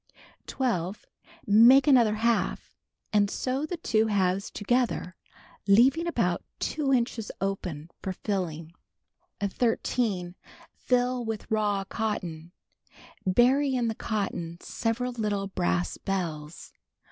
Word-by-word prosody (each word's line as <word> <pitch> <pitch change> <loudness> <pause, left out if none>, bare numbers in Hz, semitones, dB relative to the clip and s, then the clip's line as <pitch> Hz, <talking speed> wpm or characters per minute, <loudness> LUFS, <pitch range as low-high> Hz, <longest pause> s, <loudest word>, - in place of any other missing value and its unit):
12. 200 -7 -2 0.4
Make 235 +6 +7
another 240 -7 +5
half, 230 +1 0 0.4
and 205 -1 +3
sew 265 +7 -2
the 355 - -4
two 220 -8 +1
halves 195 -2 +1
together, 225 -5 -1 0.5
leaving 260 +12 +5
about 340 - 0 0.2
2 290 -3 -1
inches 235 -4 0
open 180 -6 -3
for 190 - -3
filling. 170 -5 -4 0.7
13. 205 -3 -1 0.4
Fill 250 0 0
with 220 -2 -5
raw 205 -2 +1
cotton. 175 -6 -4 0.8
Bury 260 +7 +3
in 240 -2 +1
the - - -1
cotton 195 -7 -3
several 240 +5 -2
little 210 -4 -2
brass 90 - -1
bells. 165 -5 -4
215 Hz, 105 wpm, -27 LUFS, 185-245 Hz, 0.8 s, Make